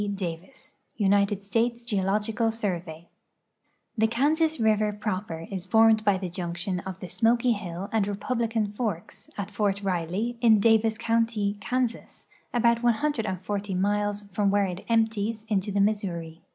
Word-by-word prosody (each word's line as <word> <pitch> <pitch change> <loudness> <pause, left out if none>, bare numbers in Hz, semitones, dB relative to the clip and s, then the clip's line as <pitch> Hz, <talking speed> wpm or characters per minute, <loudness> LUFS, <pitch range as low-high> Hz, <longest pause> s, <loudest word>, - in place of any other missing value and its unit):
Davis 180 +5 -7 0.2
United 200 -1 +2
Slnles 235 +3 0
Geoloijiad 210 +2 0
Survey 175 -6 -4 0.9
The 220 -1 +3
Kansas 310 +6 +1
river 215 -1 +2
jtroper 205 -5 -4
is 190 -1 -4
formed 220 +1 +5
bv 200 -3 +2
the 185 - -3
junction 175 +1 -3
of 190 +1 -7
the - - -7
Smok}' 235 +5 +2
Hill 185 -1 -5
and 220 -3 +2
Rcpultlican 220 0 -1
forks, 205 -8 -4
at 205 0 -4
Fort 200 -1 0
Rile}', 190 +6 -1
in 225 -3 +6
Davis 220 +1 +3
county, 225 -3 0
Kansas, 250 0 -3 0.3
about 235 -1 +3
140 210 - -1
miles 205 +2 0
from 200 +1 +2
where 200 0 +3
it 180 -1 -5
enijttics 220 -1 0
into 205 -1 0
the 200 - 0
Mis 210 +1 +2
souri. 165 -3 -5
210 Hz, 140 wpm, -26 LUFS, 190-225 Hz, 0.9 s, in